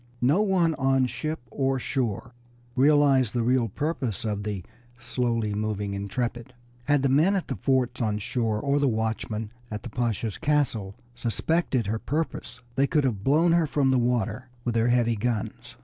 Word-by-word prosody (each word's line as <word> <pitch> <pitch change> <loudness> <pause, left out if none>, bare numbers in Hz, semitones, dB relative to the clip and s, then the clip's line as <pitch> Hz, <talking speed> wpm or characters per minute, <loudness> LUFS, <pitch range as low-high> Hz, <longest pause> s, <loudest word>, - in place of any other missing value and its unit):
No 145 +11 +3
one 185 -5 +2
on 135 -1 +3
ship 155 +4 -3
or 135 +1 0
shore 120 -3 -2 0.4
realized 135 -3 +4
the 120 - +1
real 125 0 +2
purpose 130 - -3
of 105 -2 -1
the 100 -3 -4 0.3
slowly 120 -3 -1
moving 105 -1 -2
Intrepid. 120 +5 -3 0.3
Had 145 -2 +2
the - - +4
men 160 +9 +4
at 190 - -2
the - - -1
forts 130 -2 0
on 105 -2 0
shore 110 0 -1
or 140 +4 +1
the 145 - +2
watchman 110 -1 -2 0.2
at 105 -1 -5
the 120 - -7
Pasha's 115 -2 -2
castle 135 -10 0 0.2
suspected 125 +2 0
her 110 +3 -1
purpose 155 +7 -3
they 135 +3 +2
could 150 -1 +2
have 110 -7 -1
blown 160 +7 +4
her 170 -2 +3
from 140 -2 +2
the 130 - +3
water 120 0 -1
with 120 - -1
their 115 +1 +2
heavy 120 -1 +3
guns. 120 +2 -3
125 Hz, 170 wpm, -26 LUFS, 110-140 Hz, 0.4 s, realized